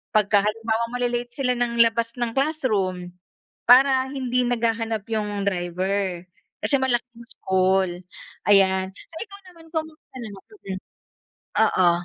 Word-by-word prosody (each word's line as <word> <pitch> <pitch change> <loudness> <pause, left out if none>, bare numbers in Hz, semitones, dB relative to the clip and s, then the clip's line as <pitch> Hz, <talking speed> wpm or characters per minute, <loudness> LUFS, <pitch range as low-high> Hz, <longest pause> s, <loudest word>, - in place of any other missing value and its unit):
Pagka 205 -1 +4
halimbawa 225 +2 0
mali-late 245 -1 -1
sila 265 -3 0
ng 240 -1 +3
labas 230 +1 -1
ng 240 -2 -2
classroom 215 - -1 0.6
para 265 +1 +6
hindi 250 -2 0
naghahanap 225 -3 -1
'yong 210 -3 -2
driver. 185 0 -1 0.4
Kasi 285 - -1
malaking 240 -2 -1 0.2
school, 185 -1 +1 0.5
ayan. 190 -1 +4
So, 320 +11 -16
ikaw 400 -3 -10
naman 335 -2 -16
kumusta 315 -3 -6
naman 205 -5 -8 0.3
mm. - - -4 0.8
Oo. 185 -5 +4
225 Hz, 120 wpm, -24 LUFS, 195-250 Hz, 0.8 s, para